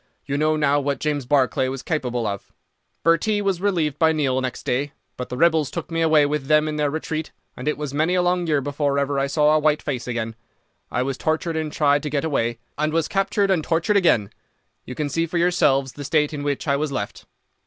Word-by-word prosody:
You 140 - -2
know 155 +2 +2
now 145 -1 +2
what 140 0 -1
James 145 -4 -2
Barclay 130 -2 +2
was 130 0 -5
capable 125 -7 -2
of. 100 -1 -4 0.5
Bhurtee 170 +6 +3
was 195 -3 -1
relieved 165 -8 0
by 160 -1 +5
Neill 135 -4 0
next 130 -2 -4
day, 140 +3 -1 0.2
but 125 - -6
the 125 - -5
rebels 160 -3 +3
took - - -6
me 165 0 0
away 155 -2 +5
with 145 -2 -2
them 150 0 +4
in 155 0 -3
their 150 -1 +1
retreat, 160 +1 -3 0.3
and 125 - -7
it 150 - 0
was 150 -2 -5
many 160 +5 +1
a 180 - +2
long 180 -1 +1
year 150 -3 +2
before 145 0 -1
ever 140 0 0
I 135 - +1
saw 150 +1 +3
a - - +4
white 150 0 +1
face 130 -5 -3
again. 115 -2 -3 0.5
I 125 - 0
was 135 0 -3
tortured 160 +1 -1
and 155 -1 -2
tried 145 -2 +2
to 150 - -4
get 145 +1 -1
away, 120 -6 0 0.2
and 155 +1 +1
was 165 -1 +1
captured 195 0 +1
and 170 -5 +1
tortured 165 +7 +1
again. 140 - +3 0.5
You 125 - -7
can 150 - -2
see 165 +4 -1
for 170 - -3
yourselves 140 -6 +2
the 145 - -8
state 150 +1 +1
in 145 - -4
which 145 +1 -2
I 140 -1 +2
was 150 0 -2
left. 100 -6 -5
150 Hz, 230 wpm, -22 LUFS, 135-160 Hz, 0.5 s, by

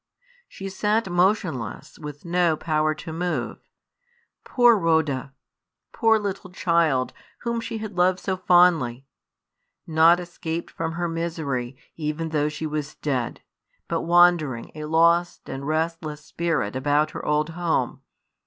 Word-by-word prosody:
She 195 - -8
sat 210 +1 0
motionless, 175 - 0
with 150 -1 -9
no 170 -2 +2
power 155 -1 0
to 160 +1 -8
move. 175 +2 -2 0.8
Poor 240 -2 +5
Rhoda! 160 -7 +1 0.6
poor 225 -1 +3
little 200 -2 -4
child, 165 -8 +1 0.3
whom 235 -1 -2
she 230 0 -5
had 215 -3 -6
loved 180 +1 +3
so 190 0 -2
fondly! 175 -9 +3 0.8
Not 165 +2 +5
escaped 170 -1 -5
from 165 0 -3
her 175 +1 -2
misery, 155 -7 -3 0.2
even 155 +1 -3
though 150 -1 +1
she 150 +1 -5
was 150 -1 -4
dead; 130 -5 -2 0.5
but 165 -1 -1
wandering, 170 -8 +3
a 155 0 -6
lost 170 +2 +2
and 135 +1 -5
restless 155 -1 -2
spirit, 160 -11 -1
about 145 +3 +1
her - - -7
old 150 +1 +1
home! 170 0 -1
165 Hz, 130 wpm, -24 LUFS, 150-175 Hz, 0.8 s, Poor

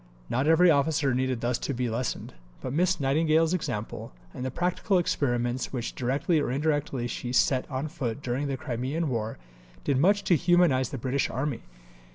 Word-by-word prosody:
Not 130 +4 +1
every 165 +2 +6
officer 140 -2 +2
needed 130 -1 0
thus 120 0 0
to 140 - -3
be 125 0 -1
lessoned, 120 +2 -3 0.3
but 130 - -5
Miss 180 +3 +2
Nightingale's 155 +4 +2
example, 110 - -4 0.2
and - - -6
the 130 - -1
practical 180 - 0
experiments 120 -7 0
which 120 -3 -3
directly 140 +6 +1
or 145 - -1
indirectly 145 -2 0
she 120 0 -4
set 130 0 +2
on 135 +2 -2
foot 135 -2 -4
during 130 +4 -1
the 135 -1 -2
Crimean 140 +3 -2
War, 115 -3 -2 0.5
did 130 - +1
much 200 +6 +3
to 180 - +4
humanize 170 -6 +3
the 135 - -5
British 130 +3 -1
Army. 130 -1 -2
135 Hz, 175 wpm, -27 LUFS, 125-160 Hz, 0.5 s, every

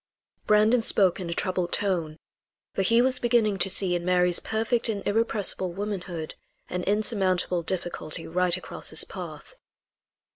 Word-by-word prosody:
Brandon 215 +3 +4
spoke 195 -5 +4
in 180 -2 -5
a - - -1
troubled 180 -1 -2
tone, 170 -6 -1 0.6
for - - -1
he 230 +5 +3
was 260 0 +2
beginning 230 -5 +1
to 190 - +3
see 185 -1 +2
in 175 -1 -2
Mary's 180 -1 +3
perfect 225 +2 -1
and 205 -3 -3
irrepressible 205 -4 0
womanhood 185 -5 -5 0.4
an 180 - -3
insurmountable 195 -4 +1
difficulty 170 -2 -1
right 180 +1 +1
across 185 - -8
his - - 0
path. - - -9
190 Hz, 145 wpm, -26 LUFS, 180-215 Hz, 0.6 s, Brandon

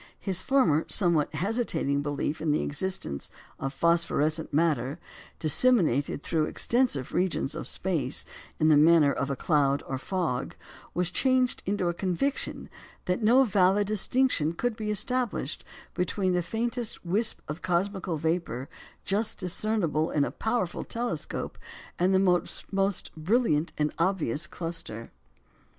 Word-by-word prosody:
His 190 -2 0
former 175 - +3
somewhat 170 -6 +2
hesitating 175 - 0
belief 145 +1 -2
in 160 - -1
the 150 - +2
existence 150 - -3 0.3
of 135 - -2
phosphorescent 160 0 +1
matter, 145 -3 +1 0.4
"disseminated 155 - +3
through 160 -2 +1
extensive 235 - 0
regions 180 -5 0
of - - -5
space 155 -8 -1 0.3
in 155 - +4
the 150 - +6
manner 155 -2 +6
of 140 - -2
a 140 - -1
cloud 140 -2 +1
or 130 -1 -4
fog," 165 -6 -2 0.4
was 180 0 0
changed 255 +2 +2
into 195 -2 0
a 175 - +1
conviction 190 +11 -2 0.4
that 180 +4 0
no 240 +5 +6
valid 195 -2 +3
distinction 215 - +1
could 245 +6 -1
be 215 -1 -4
established 220 - -1 0.3
between 185 +1 0
the 180 - +2
faintest 230 +3 -2
wisp 210 +6 +1
of 150 +3 -5
cosmical 185 -1 -1
vapour 160 -4 -2 0.4
just 210 +3 -1
discernible 180 -4 0
in 145 - +1
a - - -4
powerful 220 -6 -2
telescope, 230 -10 -4 0.4
and 180 +2 +3
the 190 - +4 0.6
most 195 0 0
brilliant 165 -2 +1
and 150 0 0
obvious 170 -4 0
cluster. 165 -10 -6
175 Hz, 135 wpm, -28 LUFS, 150-205 Hz, 0.6 s, the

